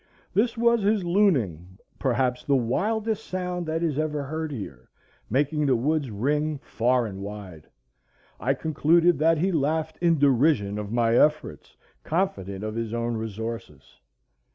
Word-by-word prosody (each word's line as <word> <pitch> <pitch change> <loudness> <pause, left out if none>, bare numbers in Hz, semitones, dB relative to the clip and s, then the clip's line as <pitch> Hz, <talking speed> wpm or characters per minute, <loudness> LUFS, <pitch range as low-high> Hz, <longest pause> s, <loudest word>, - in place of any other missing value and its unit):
This 230 +3 +1
was 235 0 +3
his 205 0 +2
looning,—perhaps 125 - 0
the 140 - +2
wildest 215 - 0
sound 180 -3 -4
that 160 +1 -1
is 155 -3 0
ever 150 -2 -1
heard 155 +2 -4
here, 70 - -8 0.4
making 145 +4 +1
the 130 - +4
woods 145 +3 0
ring 150 +8 -1
far 125 +1 +1
and 95 -3 -6
wide. 100 -6 -8 0.7
I 135 +4 +1
concluded 165 +3 +2
that 165 +1 +4
he 185 +5 +1
laughed 160 0 -1
in 170 -2 +3
derision 130 -7 +2
of 105 -1 -6
my 115 -1 +2
efforts, 150 - +1 0.3
confident 100 - -2
of 110 0 -3
his 115 0 -3
own 120 0 -1
resources. 110 - -6
140 Hz, 140 wpm, -25 LUFS, 115-165 Hz, 0.7 s, the